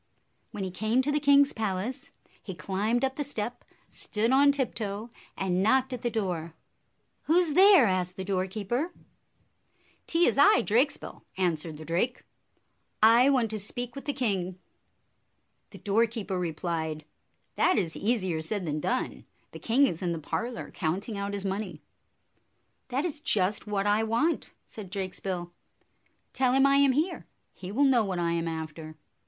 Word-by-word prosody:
When 200 - -5
he 190 - -4
came 220 +7 +1
to 290 - 0
the 295 - +1
king's 285 -1 +5
palace, 215 +3 -3 0.3
he 190 - -7
climbed 205 - 0
up 265 0 -4
the 295 - -1
step, 245 -4 -5 0.2
stood 220 +3 -2
on 280 +2 +6
tiptoe, 230 -5 -3 0.3
and 185 -1 0
knocked 260 +5 +2
at 245 - -5
the 240 - 0
door. 175 -8 -3 0.7
"Who 330 +3 +4
's 315 -4 -3
there?" 380 - +7
asked 185 -2 -1
the 190 - -5
doorkeeper. 200 - -2 1.1
"'T 340 +1 +3
is - - +2
I, 265 -4 +6
Drakesbill," 245 +8 0 0.2
answered 165 -4 -1
the 155 - -10
drake. 185 +10 -1 0.8
"I 235 +4 +7
want 245 -6 +2
to 215 - -3
speak 245 +4 -4
with 275 - -8
the 290 - 0
king." 190 -8 -2 1.1
The - - -12
doorkeeper 215 -2 0
replied, 160 -2 -3 0.5
"That - - +2
is 170 -6 -1
easier 190 -7 0
said 190 +3 -3
than 155 -1 -2
done. 250 +11 -2 0.3
The - - -9
king 255 +5 +3
is 170 -11 -2
in 175 -2 -1
the - - -3
parlor, 230 +10 -4
counting 190 +6 -3
out 200 0 -3
his 200 -1 -4
money." 190 -4 -3 1.1
"That 265 +5 -1
is 305 -4 -3
just 210 - +1
what 200 -1 -1
I 205 +1 +3
want," 235 +10 0
said 210 -4 -10
Drakesbill. 185 -2 -4 0.8
"Tell 255 -1 +2
him 270 +1 +5
I 275 0 +5
am 280 -2 +5
here. 325 +6 -1 0.3
He 185 0 -8
will 265 +7 +2
know 255 -4 +4
what 190 -3 -3
I 170 -1 0
am 170 0 -1
after." 160 -1 -6
210 Hz, 160 wpm, -28 LUFS, 185-255 Hz, 1.1 s, there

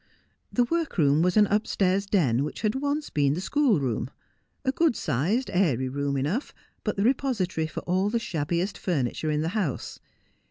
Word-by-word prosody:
The 245 - +3
workroom 195 - +1
was 180 +4 +2
an 210 - +7
upstairs 200 -2 +1
den 140 - +2
which 150 - -5
had 215 -1 +1
once 285 +2 -2
been 145 -1 +2
the - - -3
schoolroom 185 - +1 0.3
— - - -45
a 265 - +3
good 315 -2 +2
sized, 195 - 0
airy 140 -9 +2
room 140 +1 -1
enough, 160 - -2 0.3
but 210 - -1
the 200 - 0
repository 215 - 0
for - - -6
all 185 +3 0
the 235 - 0
shabbiest 175 -2 -2
furniture 155 -3 -1
in 150 0 +1
the 160 - -1
house. 185 - -3
185 Hz, 170 wpm, -26 LUFS, 150-225 Hz, 0.3 s, an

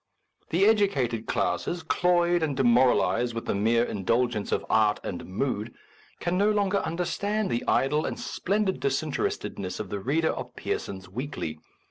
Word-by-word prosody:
The 180 +4 +3
educated 140 - +2
classes, 175 -1 -1
cloyed 175 +1 +2
and 145 -4 -1
demoral 125 -1 +4
ized 120 -1 -1
with 115 - -4
the - - 0
mere 115 +4 +2
indulgence 115 +1 0
of - - 0
art 105 -1 +3
and 90 - -5
mood, 110 +2 -2 0.4
can 175 +2 0
no 205 +1 +4
longer 205 -2 +2
understand 200 +5 -1
the 120 - -1
idle 150 +3 +2
and - - -4
splendid 200 0 -1
disinterestedness 135 -9 -2
of 105 -3 -5
the 100 - -2
reader 155 +9 +1
of - - -7
Pearsons 95 -1 -4
Weekly. 95 - -5
135 Hz, 150 wpm, -27 LUFS, 110-175 Hz, 0.4 s, demoral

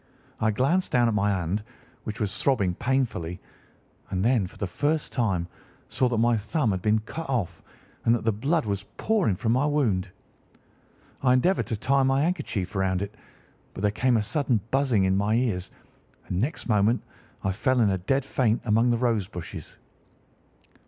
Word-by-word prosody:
I 110 - +2
glanced 140 - +1
down 120 -1 +4
at 115 - +1
my 105 -1 +2
hand, 95 +1 -1 0.4
which 110 -1 -5
was 100 -3 -2
throbbing 100 -10 +1
painfully, 110 -8 -1 0.7
and 95 +1 -1
then, 115 -6 +3
for - - -15
the - - -2
first 145 - -1
time, 95 -9 0 0.4
saw 125 +3 +1
that 120 - -1
my 120 +1 +3
thumb 110 +3 0
had 95 -1 -2
been 105 +3 +3
cut 160 +7 -7
off 120 -10 -2 0.4
and 115 - +4
that 120 - -3
the 115 - +4
blood 140 +9 0
was 100 -2 -2 0.2
pouring 210 - +1
from 110 +4 -1
my 130 +5 +2
wound. 110 -11 +1 1.1
I 125 -2 +4
endeavoured 175 +10 +2
to 115 - -2
tie 135 +6 +2
my 135 +1 +2
handkerchief 145 - -2
round 95 0 +1
it, 100 +1 -6 0.6
but 95 - -6
there 105 - +3
came 125 +3 +2
a 105 - +1
sudden 130 -1 +1
buzzing 130 -7 +2
in 95 0 +2
my 100 +3 +1
ears, 110 -7 0 0.6
and 90 - -2
next 145 +5 -2
moment 110 +1 +2 0.4
I 95 - +1
fell 130 +7 +1
in 105 -4 +4
a 95 - -1
dead 135 +9 0
faint 120 -4 +1
among 115 +2 +3
the 120 - +2
rose 115 -5 +1
bushes. 90 -4 -8
115 Hz, 180 wpm, -26 LUFS, 100-130 Hz, 1.1 s, down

